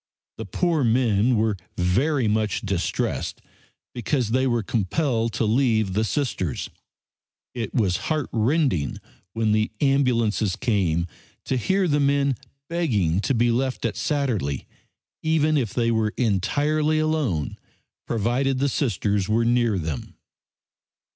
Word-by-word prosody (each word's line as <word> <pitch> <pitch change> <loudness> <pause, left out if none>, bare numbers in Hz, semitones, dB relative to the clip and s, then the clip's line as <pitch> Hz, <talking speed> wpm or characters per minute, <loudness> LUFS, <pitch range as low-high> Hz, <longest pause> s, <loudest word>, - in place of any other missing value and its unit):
The 110 - -4
poor 165 - +1
men 115 -1 +3
were 110 -2 +1 0.2
very 120 - +1
much 105 -1 0
distressed 100 -4 -2 0.5
because 120 -1 -1
they 130 +2 +2
were 120 -3 +1
compelled 115 - 0
to 115 - 0
leave 110 -4 +2
the 110 +3 +1
Sisters. 110 - -2 0.8
It 115 -4 -4
was 95 -7 +2
heartrending 130 - 0 0.4
when 115 -1 +1
the 110 +1 +2
ambulances 115 -8 +2
came 95 -9 +1 0.4
to 130 - 0
hear 190 - +1
the 145 -2 +2
men 140 -1 +2 0.3
begging 105 - +1
to 130 +6 0
be 120 +1 +3
left 125 +1 -1
at 110 - -1
Satterlee, 120 - -1 0.6
even 155 -1 +2
if 125 -8 0
they 115 -1 +1
were 110 -2 0
entirely 145 - +1
alone, 155 - -1 0.5
provided 120 +4 0
the 140 +2 +1
Sisters 105 - 0
were 115 +2 +2
near 120 -3 +2
them. 80 -5 -5
115 Hz, 125 wpm, -24 LUFS, 105-140 Hz, 0.8 s, men